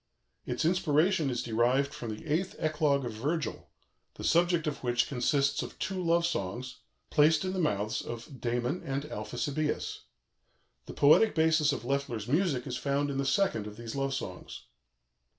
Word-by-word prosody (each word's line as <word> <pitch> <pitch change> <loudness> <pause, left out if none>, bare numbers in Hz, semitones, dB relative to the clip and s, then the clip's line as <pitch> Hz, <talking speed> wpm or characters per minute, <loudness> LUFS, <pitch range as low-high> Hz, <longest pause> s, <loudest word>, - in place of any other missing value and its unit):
Its - - -1
inspiration 170 -1 +2
is 120 -2 -2
derived 125 +5 +1
from 125 -6 -6
the 110 +7 -7
Eighth 165 +5 -1
Eclogue 150 -3 +1
of 120 - -3
Virgil, 140 +5 -3 0.5
the - - -8
subject 170 0 +3
of 150 -3 -3
which 120 -1 +1
consists 140 +2 +1
of - - -7
two 190 -1 -3
love 170 0 +3
songs, 125 - -3 0.3
placed 155 +2 +4
in 185 - -2
the 190 - -2
mouths 105 - 0
of 120 +3 -8
Damon 120 +7 -1
and 135 +1 -2
Alphesibœus. 145 +4 -3 0.9
The - - -8
poetic 155 +10 +5
basis 160 -2 +3
of - - -4
Loeffler's 135 -6 -2
music 145 -2 +1
is 125 -3 -3
found 140 0 0
in 135 - -2
the 135 - 0
second 140 - +1
of 105 0 -9
these 115 -1 -6
love 135 -1 -1
songs. 90 -9 -7
140 Hz, 165 wpm, -30 LUFS, 120-160 Hz, 0.9 s, poetic